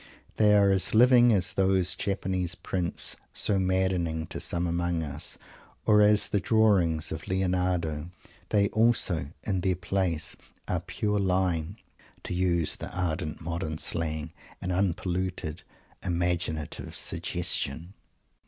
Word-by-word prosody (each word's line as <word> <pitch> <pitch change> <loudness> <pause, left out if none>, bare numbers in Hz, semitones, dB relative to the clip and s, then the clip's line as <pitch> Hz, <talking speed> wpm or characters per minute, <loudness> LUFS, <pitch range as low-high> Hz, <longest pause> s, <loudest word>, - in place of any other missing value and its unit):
They 105 -1 +5
are 100 -1 +5
as 95 +2 +1
living 120 +1 +7
as 95 -4 +1
those 95 -2 +2
Japanese 95 -3 -2
Prints 90 0 -1 0.2
so 100 -2 +1
maddening 95 -4 0
to - - -4
some 85 0 -1
among 85 -1 -1
us, 75 +3 -3 0.5
or 105 -1 +5
as 105 0 +4
the 100 - +1
drawings 95 -6 +2
of 80 - -6
Lionardo. 90 -4 0 0.4
They 100 -1 +3
also 110 -9 +2 0.2
in 95 -3 -1
their 95 0 +1
place 90 -2 -1 0.3
are - - 0
"pure 105 -1 -2
line" 90 -1 0 0.5
to - - -4
use 85 -4 +1
the 85 - -6
ardent 80 -3 -2
modern 85 -1 -3
slang, 80 0 -3 0.3
and 90 - -3
unpolluted 90 -2 -1 0.4
"imaginative 85 -3 -2
suggestion." 80 +7 -1
90 Hz, 125 wpm, -28 LUFS, 85-95 Hz, 0.5 s, living